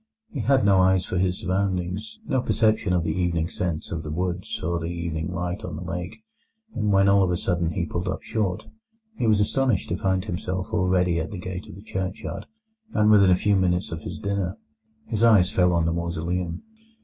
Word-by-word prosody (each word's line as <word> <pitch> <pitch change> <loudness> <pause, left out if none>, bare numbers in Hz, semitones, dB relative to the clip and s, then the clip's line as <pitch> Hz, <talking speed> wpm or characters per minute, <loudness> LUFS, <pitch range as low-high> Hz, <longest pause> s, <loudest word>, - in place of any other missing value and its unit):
He 145 - -4
had 125 0 +3
no 100 -1 +5
eyes 95 0 +4
for 90 - -2
his 90 0 +1
surroundings, 95 - -2
no 130 -9 +1
perception 110 -5 +2
of 90 -2 +2
the - - -1
evening 85 -3 0
scents 85 -5 -3
of 80 - -2
the 75 - -7
woods 90 +3 -3
or 85 +1 0
the 80 0 -4
evening 85 -1 -3
light 90 +2 -3
on 85 - -5
the 80 - -6
lake; 90 - -5 0.5
and 105 -1 0
when 95 0 +4
all 100 0 +5
of 95 - +2
a 90 - +1
sudden 85 -2 0
he 85 - -1
pulled 85 +3 -3
up 90 - -3
short, 100 -5 -2 0.5
he 120 - 0
was 105 -2 +4
astonished 120 0 +1
to 85 - 0
find 95 +1 0
himself 95 -1 -3
already 90 -4 +2
at 80 0 -3
the 105 - -6
gate 90 0 -6
of - - -10
the 100 - -12
churchyard, 95 -3 -4 0.5
and 105 -1 +4
within 100 -3 +6
a 90 - +6
few 100 +2 +2
minutes 90 -1 +1
of 80 0 -5
his 85 +1 -6
dinner. 100 +1 -2 0.5
His 110 -1 -3
eyes 105 -6 +5
fell 90 -1 +3
on 85 -1 +2
the 80 - +1
mausoleum. 85 +1 -3
90 Hz, 210 wpm, -25 LUFS, 85-100 Hz, 0.5 s, within